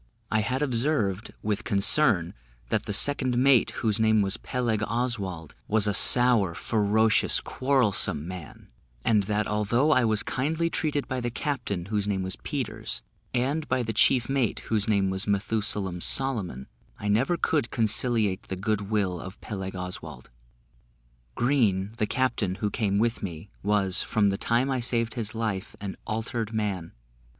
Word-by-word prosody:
I 110 - +3
had 130 +6 -1
observed, 115 -6 0
with 105 +1 -1
concern, 100 - +3 0.4
that - - -1
the - - -2
second 130 +3 +2
mate, 130 -1 +4 0.2
whose 110 0 +1
name 110 -1 +3
was 95 +1 0
Peleg 120 -5 -2
Oswald, 105 - -3
was 110 -1 +3
a 105 - +1
sour, 115 -4 +5
ferocious, 110 +5 +2
quarrelsome 125 - +1
man; 90 -3 -9 0.4
and 110 -2 +4
that 105 +1 0
although 105 +8 +1
I 130 -5 +4
was 110 -1 +3
kindly 160 +5 -1
treated 145 -3 -1
by 130 -1 -3
the 120 - -1
captain, 120 -8 -3
whose 105 0 -2
name 95 -2 -1
was 95 0 -4
Peters, - - -4 0.3
and 140 +5 -1
by 130 -1 0
the 110 -1 -3
chief 120 +3 +3
mate, 135 -5 0
whose 105 -1 +1
name 100 -3 +2
was 95 +3 -1
Methusalem 100 -3 -1
Solomon, 105 - 0 0.3
I 105 - -5
never 125 +12 +2
could 150 -6 0
conciliate 110 -3 +1
the 95 - -3
good 100 +1 -2
will 100 -5 0
of 95 +4 -9
Peleg 95 -2 -6
Oswald. 90 -7 -6 1.0
Green, 110 -7 +1
the 105 - 0
captain, 115 -8 0
who 105 +1 -2
came 100 -4 0
with 115 +2 0
me, 90 +1 -7
was, 100 -2 +2
from 105 -2 +1
the 100 - -1
time 120 +3 +1
I 130 - 0
saved 115 -1 +1
his 115 -3 -2
life, 110 -3 -3
an 100 -2 -5
altered 110 0 -3
man. 100 -6 -3
110 Hz, 160 wpm, -26 LUFS, 100-120 Hz, 1.0 s, sour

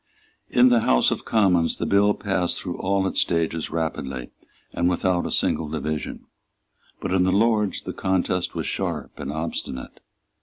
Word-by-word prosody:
In 125 +1 +5
the 120 -1 +5
House 60 - +3
of - - -3
Commons 90 -7 +3
the - - -3
bill 100 +1 +3
passed 95 -4 -1
through 90 -2 -4
all 95 0 +1
its 95 - +1
stages 80 -1 0
rapidly 70 -6 -3 0.4
and 85 +1 +1
without 90 0 +1
a - - -5
single 80 - +1
division. 80 0 -4 0.7
But - - -3
in 95 -1 +3
the 95 - +2
Lords 105 0 +2
the - - -5
contest 95 -1 -1
was - - -2
sharp - - -3
and 70 - -4
obstinate. 80 -5 -5
90 Hz, 160 wpm, -24 LUFS, 80-100 Hz, 0.7 s, In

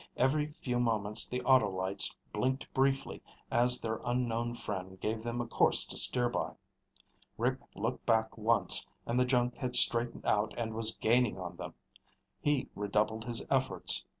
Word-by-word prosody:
Every 150 +4 +1
few 125 -2 -1
moments 110 -2 +1
the 125 0 -4
auto 125 -5 +4
lights 95 +1 0 0.2
blinked 130 +1 -2
briefly 135 0 0 0.3
as 125 +1 +5
their 110 -1 -4
unknown 120 -1 -1
friend 95 -4 -6
gave 110 +3 -3
them 120 +1 -4
a 120 - -2
course - - +3
to - - -6
steer 125 -1 +4
by. 120 - -3 0.8
Rick - - 0 0.2
looked - - -3
back 110 -1 +1
once 115 +1 +2 0.2
and 120 +2 0
the 125 - +3
junk 125 -1 0
had 125 -2 -3
straightened 120 0 +3
out 105 +1 0
and 115 -2 -3
was 115 0 0
gaining 120 -1 +1
on 90 -2 -7
them. - - -8 0.6
He 145 -2 0
redoubled 105 +2 -1
his 120 -2 -3
efforts. 130 -10 +2
115 Hz, 160 wpm, -31 LUFS, 110-125 Hz, 0.8 s, as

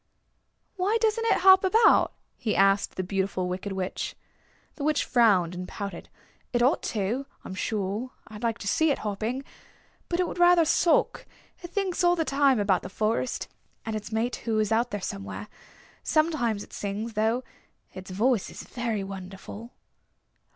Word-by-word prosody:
"Why 395 +5 +2
doesn't 450 +1 +1
it - - +3
hop 380 0 +8
about?" 435 +4 +5 0.2
he 215 - -2
asked 195 +1 +3
the 185 - -2
Beautiful 190 -1 -1
Wicked 185 +3 -4
Witch. 190 -1 -3 0.6
The 285 - -7
Witch 300 0 +1
frowned 200 -9 +3
and 180 0 -6
pouted. 200 -4 -6 0.4
"It 240 -1 +2
ought 260 - +3 0.2
to, 230 +8 -1 0.2
I'm - - -6
sure. 205 +4 -2 0.2
I 215 - -10
like 230 +1 -1
to 200 - -7
see 315 +10 +3
it 280 - +2
hopping. 220 +6 -2 0.7
But 345 - -1
it 360 - +2
would 350 - -6
rather 350 -1 +6
sulk. 335 +2 +2 0.3
It 345 - -8
thinks 380 -1 -1
all 350 0 +5
the 325 -2 0
time 275 -3 +3
about 200 -3 +2
the 185 - -7
forest, 220 +5 -1 0.4
and 220 -1 -3
its 215 0 -6
mate 230 +3 -1
who 225 -2 -2
is 215 0 +1
out 235 +2 +2
there 205 -3 -4
somewhere. 100 - -5 0.5
Sometimes 290 -10 +1
it - - -16
sings, 210 +3 -4
though. 225 +4 +1 0.5
Its 185 0 -9
voice 215 +3 +1
is - - -10 0.4
wonderful." 195 +4 -8
225 Hz, 165 wpm, -27 LUFS, 195-295 Hz, 0.7 s, hop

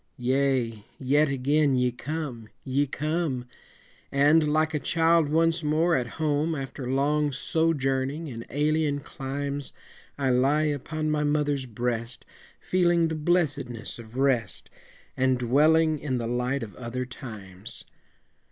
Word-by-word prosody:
Yea, 125 -4 0
yet 145 +3 +2
again 140 +1 +2
ye 125 -1 +2
come! 135 -3 -5 0.2
ye 140 +2 0
come! 150 -3 -2 0.7
And, 150 +2 +4
like 155 +1 +2
a 150 - 0
child 165 0 +3
once 165 +2 +2
more 160 +3 +2
at 125 -2 0
home 155 +1 0
After 135 -2 -5
long 145 +2 +1
sojourning 140 0 0
in 115 -4 -6
alien 150 0 +1
climes, 140 0 -5 0.4
I 135 -2 +1
lie 135 +5 +3
upon 155 +1 -2
my 150 -1 +1
mother's 145 -2 0
breast, 120 +1 -3 0.3
Feeling 175 -2 +2
the 160 - -2
blessedness 150 -9 0
of 115 +1 -11
rest, 125 - 0 0.4
And 130 0 +2
dwelling 155 +6 +3
in 130 -4 -2
the 120 - -3
light 125 +3 -1
of 105 - -9
other 125 +1 -4
times. 105 -7 -8
140 Hz, 130 wpm, -26 LUFS, 125-155 Hz, 0.7 s, And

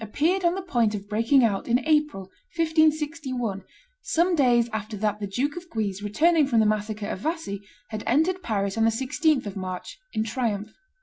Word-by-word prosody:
appeared 325 - 0
on 345 +1 +3
the 385 - -3
point 235 - +1
of 200 0 -7
breaking 230 +6 +3
out 200 -4 0
in 240 0 +4
April, 300 -9 +1 0.3
1561, 305 - 0 0.4
some 350 +3 +1
days 245 -5 +4
after 215 0 -4
that 210 0 -1
the 205 - -3
Duke 265 +9 -1
of 350 0 -8
Guise, 205 - -2
returning 300 +9 +3
from 235 -4 +3
the 220 - +4
massacre 210 0 -1
of - - -4
Vassy, 310 - -3 0.3
had 215 -1 -5
entered 325 +9 +2
Paris, 200 - -1
on 225 - +4
the - - +5
16th 265 +5 +1
of 200 - -6
March, 185 - -6
in 215 - 0
triumph. 220 -3 -2
235 Hz, 185 wpm, -25 LUFS, 210-310 Hz, 0.4 s, the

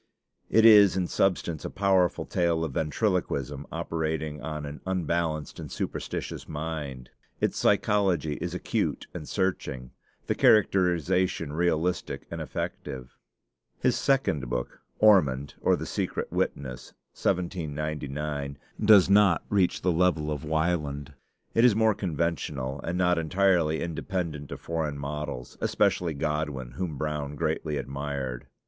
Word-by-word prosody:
It 110 0 +5
is 105 -4 +8
in 90 - +1
substance 85 -4 0
a - - -3
powerful 95 -3 +2
tale 85 -2 +1
of 80 - -3
ventriloquism 75 - -1
operating 80 -2 -3
on 75 +1 -4
an 70 +1 -8
unbalanced 85 -4 -1
and - - -7
superstitious - - -4
mind. 75 -5 -5 0.3
Its - - 0
psychology 95 -8 +2
is - - -3
acute - - -1
and 75 - -7
searching; 75 -10 -2 0.3
the - - +1
characterization 90 -5 +3
realistic 85 +1 0
and - - -4
effective. 65 -1 -5 0.7
His - - +2
second 80 - +1
book, - - -4 0.2
'Ormond: 70 -11 +4
or - - +4
the - - -5
Secret - - -3
Witness' 65 -2 -3 0.2
(1799), 75 -4 -2 0.3
does 105 -3 +7
not 100 -3 +5
reach 95 -3 +1
the 90 - +3
level 80 -3 +2
of 75 0 -3
'Wieland.' 75 -3 -1 0.4
It 115 - +4
is 120 -4 +6
more 110 0 +4
conventional, 75 -7 -2
and 85 +2 -2
not 90 -1 +3
entirely 85 -2 +2
independent 85 -3 -4
of - - -5
foreign 80 -3 -2
models, 70 -3 -5
especially 85 -4 +1
Godwin, 75 -4 -2
whom 75 +3 -4
Brown 75 -1 -3
greatly 80 -1 -1
admired. 70 -1 -4
80 Hz, 125 wpm, -27 LUFS, 70-90 Hz, 0.7 s, is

